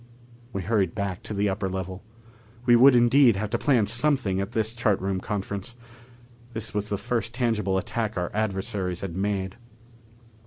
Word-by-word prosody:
We 100 -3 -4
hurried 100 -3 0
back 100 -3 -3
to - - -7
the 100 +1 +1
upper 95 0 -1
level. 95 0 -5 0.6
We 120 -1 +6
would 130 +2 +7
indeed 120 0 +5
have 105 +1 -3
to 120 - 0
plan 125 -8 +3
something 120 -6 +2
at 100 +4 -5
this 110 -1 0
chart 110 -4 +1
room 95 0 -2
conference. 100 +3 -4 0.8
This 110 -1 -4
was 105 0 -2
the 100 - -1
first 115 +2 -2
tangible 110 -6 0
attack 110 +2 -2
our 90 -1 -2
adversaries 95 -3 -2
had 95 -4 -5
made. 95 -1 -2
105 Hz, 165 wpm, -26 LUFS, 95-115 Hz, 0.8 s, would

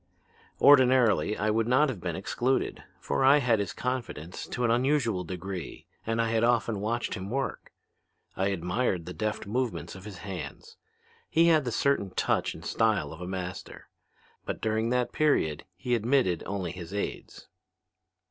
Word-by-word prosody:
"Ordinarily 125 - +5
I 110 +1 +1
would 110 +1 +1
not 130 +5 +4
have 110 -9 -5
been 85 -2 -3
excluded, 120 +8 -1 0.2
for 70 - -1
I 135 +2 +7
had 120 -6 +2
his 100 -3 -2
confidence 120 -10 -4
to 125 - -2
an 115 - +3
unusual 120 -6 +1
degree 90 0 -6 0.2
and 115 +1 0
I 115 -1 +1
had 115 0 +2
often 115 -3 +2
watched 115 +4 -2
him 95 -1 -5
work. 135 +4 -3 0.6
I 95 - +1
admired 90 0 -1
the 90 - -6
deft 110 +2 -3
movements 120 +3 -2
of 95 +1 -11
his 105 -4 -8
hands. 95 -1 -7 0.5
He 165 +2 +4
had 155 -4 +4
the 120 - -1
certain 120 -4 +1
touch - - 0
and - - -11
style 110 -9 +1
of 80 - -11
a 90 - -5
master. 90 -1 -6 0.5
But - - -4
during 110 +1 0
that 125 0 +1
period 85 - +1
he 120 +7 -2
admitted 120 -6 +2
only 95 -4 -3
his 90 +1 -8
aids. 100 - -5
110 Hz, 165 wpm, -28 LUFS, 95-125 Hz, 0.6 s, I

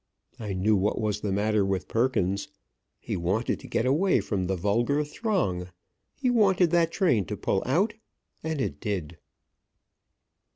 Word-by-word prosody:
I 105 -3 -4
knew 100 +4 +2
what 100 +2 +1
was 105 -2 -1
the 105 - -2
matter 105 +1 +2
with 95 -1 -1
Perkins. 100 -5 0 0.5
He - - -4
wanted 95 +7 -1
to - - -11
get 115 - 0
away 165 +9 +3
from 95 -4 -2
the 95 - 0
vulgar 115 - +1
throng. 145 - -1 0.5
He 270 - -2
wanted 190 -7 +4
that 170 -2 +3
train 165 - +2
to - - -5
pull 95 - 0
out 190 - +2 0.5
And 160 -1 -2
it 130 - -2
did. 90 -7 -4
110 Hz, 155 wpm, -27 LUFS, 95-160 Hz, 0.5 s, wanted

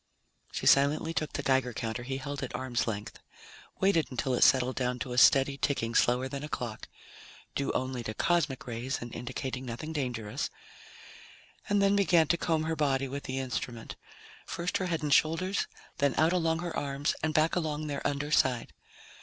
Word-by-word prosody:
She - - -4
silently 145 +4 +4
took 155 -2 -2
the - - -3
Geiger 130 -2 +2
counter 115 +2 -3
he 135 +2 -4
held 140 +1 -5
at 135 - -4
arm's 125 -3 -1
length, 105 -2 -4 0.6
waited 190 -5 +3
until 130 0 -1
it 125 - 0
settled 130 -1 +4
down 125 -1 -1
to 125 0 -4
a - - -4
steady 135 +1 +5
ticking 115 -5 0
slower 125 +3 +3
than 140 +2 -5
a 150 - -5
clock 120 -7 -5 0.7
due 140 - -1
only 130 -1 -2
to 110 - -4
cosmic 170 -6 +1
rays 120 +3 -3
and 120 -1 -8
indicating 130 +1 -4
nothing 130 +6 -5
dangerous 125 -3 -3 1.2
and 205 -1 +3
then 200 0 +4
began 180 -5 +4
to - - +4
comb 160 -2 0
her 160 +1 -1
body 135 -3 +1
with 140 +2 -6
the 130 -1 -3
instrument. 125 -3 -4 0.5
First 170 +1 -2
her 185 - -2
head 165 -3 -2
and 145 -2 +2
shoulders, 185 +7 +2 0.3
then 140 -2 +2
out 160 +3 +4
along 165 -2 +1
her 175 -1 -4
arms 140 +1 -1
and 160 - 0
back 155 +1 +2
along 155 -3 -1
their 145 -1 -3
under 145 +1 -2
side. 125 -5 +2
140 Hz, 185 wpm, -30 LUFS, 125-160 Hz, 1.2 s, steady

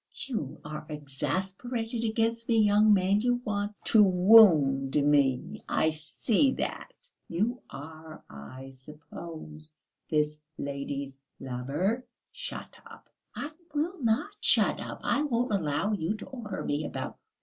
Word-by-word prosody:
"You 220 - -4
are 150 0 -6
exasperated 190 - -3
against 230 +1 0
me, 230 - +4
young 210 0 +5
man, 195 0 +4
you 245 +1 +2
want 205 -1 -2
to 220 - +5
wound 180 -9 +6
me, 140 -3 +2
I 160 - +2
see 200 - +1
that. - - -4 0.4
You 215 +9 -1
are, 155 +2 -10
I 130 - -10
suppose, 155 +2 -10 0.4
this 150 -1 0 0.2
lady's 140 -1 -5 0.2
lover?" 140 - -2 0.3
"Shut - - -7
up!" - - -15 0.3
"I 295 - -5 0.2
will 325 +3 -1
not 235 - 0
shut - - +3
up! - - -7
I 285 - +1
won't 245 -5 0
allow 160 +1 0
you 185 +1 -1
to 215 - -8
order 230 -7 -6
me 145 +1 -1
about! - - -5
185 Hz, 125 wpm, -29 LUFS, 145-225 Hz, 0.4 s, wound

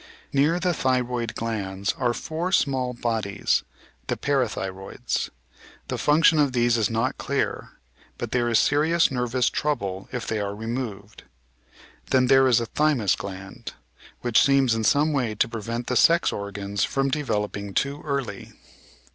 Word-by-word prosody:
Near 150 +5 +3
the 180 0 +1
thyroid 125 -4 -1
glands 100 -4 -2
are 120 -2 0
four 165 +4 -3
small 130 -7 +1
bodies 110 -4 0 0.2
— - - -33
the - - -1
"para 135 -5 +1
thyroids." 95 -1 -4 0.6
The - - -3
function 155 +1 +4
of 145 -3 +2
these 120 -1 +3
is 110 -3 +1
not 115 +4 -1
clear, 140 0 -2 0.4
but - - -5
there 120 -1 +1
is 115 - +3
serious 160 +6 +3
nervous 125 -1 0
trouble 100 -10 -2
if 125 -3 -4
they 110 - -2
are 100 0 -3
removed. 110 -2 -6 0.8
Then 130 -1 +4
there 135 +1 +5
is 120 -3 +4
a 115 - -2
"thjrmus 130 -6 +1
gland," 95 0 -8 0.5
which 120 -2 +3
seems 135 -3 +3
in 115 -1 -1
some 150 +6 +3
way 120 -6 -1
to - - +2
prevent 115 +1 -4
the 125 - -2
sex 170 +6 +4
organs 100 0 -3
from 135 0 0
developing 105 -8 -2
too 140 +1 -1
early. 140 -5 -4
120 Hz, 155 wpm, -24 LUFS, 105-140 Hz, 0.8 s, there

